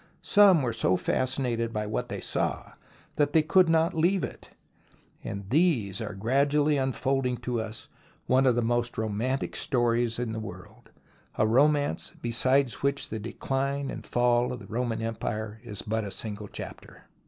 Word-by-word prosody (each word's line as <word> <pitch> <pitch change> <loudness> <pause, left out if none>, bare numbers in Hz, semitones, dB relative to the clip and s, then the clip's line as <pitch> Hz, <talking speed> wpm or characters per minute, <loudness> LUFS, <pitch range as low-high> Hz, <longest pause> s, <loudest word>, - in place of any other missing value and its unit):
Some 195 -7 +6
were 120 -2 -1
so 95 -4 +2
fascinated 125 -3 0
by 105 -1 -2
what 105 - -3
they - - -5
saw - - -2 0.5
that 145 -1 +2
they 160 - +5
could 180 +2 +4
not 165 +2 +3
leave 175 +4 +2
it, - - -7 0.7
and 100 -1 -6
these 130 - +2
are 105 -3 -5
gradually 140 +7 +2
unfolding 130 -1 0
to 120 -2 -1
us 110 0 -7 0.4
one 130 +1 +3
of 125 - +4
the 120 - +1
most 120 +1 0
romantic 110 +5 -2
stories 120 -2 +1
in 120 -2 -2
the 110 - -3
world, 90 -4 -10 0.5
a - - +2
romance 145 +5 +2
beside 130 +3 +2
which 140 0 -1
the 110 - -4
Decline 135 +5 -2
and - - -7
Fall 120 0 +2
of 125 - -4
the 110 - -11
Roman 115 +1 -2
Empire 110 -1 -4
is 105 -4 -7
but 110 0 -1
a 100 - -4
single 105 0 -5
chapter. - - -10
120 Hz, 165 wpm, -27 LUFS, 110-140 Hz, 0.7 s, Some